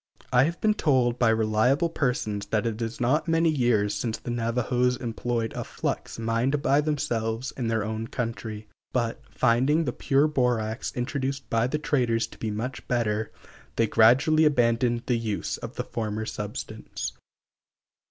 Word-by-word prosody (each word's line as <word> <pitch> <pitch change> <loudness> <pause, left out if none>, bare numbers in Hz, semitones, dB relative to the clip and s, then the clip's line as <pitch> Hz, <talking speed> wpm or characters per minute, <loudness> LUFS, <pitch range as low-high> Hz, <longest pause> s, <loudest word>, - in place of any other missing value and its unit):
I 125 +1 +6
have 170 +2 -3
been 215 -1 +3
told 130 - +2
by 120 - +4
reliable 110 +8 +2
persons 120 -9 -1
that 110 +1 0
it 115 0 -2
is 115 0 -3
not 130 +7 +1
many 165 0 +3
years 120 -7 +2
since 110 +2 -2
the 120 - -6
Navajos 120 +1 +1
employed 115 -1 -2
a - - -3
flux - - -4
mined 115 +5 0
by 140 +2 +4
themselves 120 -5 -2
in 125 -3 -2
their 110 -2 0
own 110 +1 -3
country; 115 -4 -4 0.3
but, 115 -3 -1
finding 130 +7 +2
the 125 - -1
pure 140 +1 +2
borax 125 -5 0
introduced 135 +1 -2
by 115 +1 +2
the 150 - -1
traders 120 -6 +1
to - - -15
be 110 - -2
much 115 +4 -4
better, 110 -3 0 0.4
they 115 - +3
gradually 125 +9 +5
abandoned 120 -4 +2
the 120 -3 +1
use 110 -3 -2
of - - -8
the - - -2
former 110 -1 -3
substance. 105 -1 -5
120 Hz, 160 wpm, -26 LUFS, 115-135 Hz, 0.4 s, I